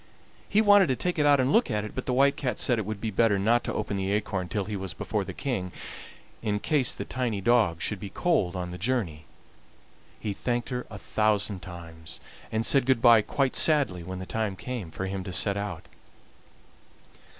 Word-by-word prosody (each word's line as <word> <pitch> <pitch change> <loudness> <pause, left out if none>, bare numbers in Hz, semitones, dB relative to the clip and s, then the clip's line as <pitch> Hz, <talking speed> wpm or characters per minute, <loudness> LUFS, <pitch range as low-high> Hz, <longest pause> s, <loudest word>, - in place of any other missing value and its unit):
He 210 - +4
wanted 205 -3 +6
to 130 - +1
take 180 +4 -2
it 145 - +4
out 145 -1 +5
and 130 +1 +2
look 230 - +4
at 105 -3 -1
it, 105 - -7
but 130 - -5
the 125 - +1
White 140 +2 +4
Cat 125 -6 -2
said 125 -3 +2
it 105 - -4
would 110 -1 -4
be 110 +1 -3
better 105 0 +3
not 115 +5 +2
to - - -2
open 105 -2 -2
the 95 0 -1
acorn 100 -3 -1
till 105 -3 -2
he 105 +1 -4
was 95 -3 -5
before 105 +4 -2
the - - -6
King, 100 -10 -3 0.7
in 105 -2 -1
case 140 +1 +2
the - - -5
tiny 125 -5 -2
dog 100 -6 +2
should 105 - -1
be 100 - -6
cold 95 - 0
on 90 -1 -4
the 90 - -7
journey. 95 -8 -1 0.9
He 105 - -3
thanked 120 +3 -2
her 125 -1 -4
a - - -8
thousand 105 -3 0
times, 85 -2 -10 0.3
and 110 +1 0
said 135 -3 +4
good 130 -3 +3
by 115 -2 +7
quite 135 +4 -1
sadly 140 - +3
when 95 +2 -6
the 95 - -6
time 110 -1 -2
came 115 -4 -5
for 95 - -5
him 95 0 -4
to 95 - -6
set 100 +3 +2
out. 100 0 -4
105 Hz, 215 wpm, -27 LUFS, 95-125 Hz, 0.9 s, by